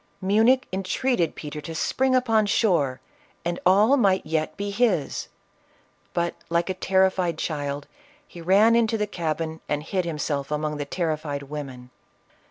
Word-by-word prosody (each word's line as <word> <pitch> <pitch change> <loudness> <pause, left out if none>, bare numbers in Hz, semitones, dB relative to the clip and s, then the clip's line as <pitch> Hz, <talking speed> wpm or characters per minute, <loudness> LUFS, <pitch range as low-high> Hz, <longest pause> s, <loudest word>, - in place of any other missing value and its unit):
Munich 225 +7 +3
entreated 190 -1 0
Peter 150 0 -6
to 160 +2 -7
spring 260 +10 +1
upon 225 -4 +3
shore, 170 - +2 0.5
and 175 0 -1
all 210 +8 +5
might 195 - +2
yet 155 0 -2
be 200 0 -3
his; 205 - 0 0.9
but, 170 0 0 0.2
like 170 +2 +1
a - - -1
terrified 185 -2 +1
child, 145 -3 -3 0.4
he 175 - -11
ran 200 +7 +5
into 230 -1 +2
the 210 - 0
cabin 160 -4 -3
and 150 0 -1
hid 185 +3 -1
himself 150 -4 -2
among 150 0 -2
the 145 - -3
terrified 155 -3 -2
women. 135 -4 -8
170 Hz, 145 wpm, -25 LUFS, 150-205 Hz, 0.9 s, all